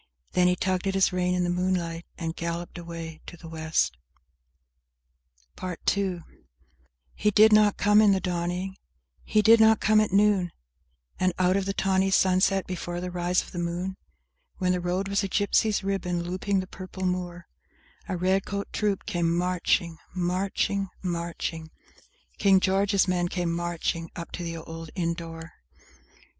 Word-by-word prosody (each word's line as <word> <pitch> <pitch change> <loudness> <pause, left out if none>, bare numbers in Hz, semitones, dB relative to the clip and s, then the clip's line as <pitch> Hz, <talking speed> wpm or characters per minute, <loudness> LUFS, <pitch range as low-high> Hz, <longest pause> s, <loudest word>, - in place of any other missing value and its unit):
Then 180 0 +3
he 180 - +3
tugged 185 +1 -1
at 195 - 0
his 190 -1 +3
rein 180 0 +1
in 180 - +1
the 175 - 0
moonliglt, 175 -2 -1
and 165 -1 -4
galloped 170 +1 -4
away 165 -2 -7
to 175 - -9
the 165 - -11
West. 160 - 0 1.6
PART 180 -2 -5
TWO 190 -4 0
I - - -24 0.8
He 210 - +1
did 215 +1 +6
not 210 -1 +5
come 210 +1 +5
in 210 -2 +6
the 190 - +2
dawning; 180 +1 -3 0.5
he 215 -1 +2
did 225 +1 +7
not 220 -1 +6
come 215 0 +4
at 215 - 0
noon; 195 -3 +3 0.7
And 185 -1 +2
out 185 0 +3
o' 200 - +2
the 195 +1 -3
tawny 190 0 +2
sunset, 190 0 +3
before 175 -1 -4
the 180 0 -4
rise 175 +1 +1
o' - - -14
the 175 - -5
moon, 175 +2 -3 0.6
When 180 -1 +1
the 180 - +1
road 180 +2 -1
was 200 +1 0
a 195 - -2
gypsy's 205 +1 +2
ribbon, 180 -3 -1
looping 185 +2 -1
the 185 - -8
purple 185 0 -7
moor, 175 -1 -3 0.6
A 185 - -1
red 190 +2 +2
coat 200 0 -4
troop 205 -3 -1
came 170 -1 0
marching— 175 -1 0 0.2
Marching—marching— 180 -3 -2 0.7
King 195 -2 +5
George's 195 +1 +2
men 180 -1 +1
came 175 -1 -2
matching, 170 -1 -2
up 170 - -7
to - - -6
the 165 -1 -4
old 165 0 -8
inn 170 -3 0
door. 165 -1 -8
180 Hz, 165 wpm, -26 LUFS, 175-195 Hz, 1.6 s, did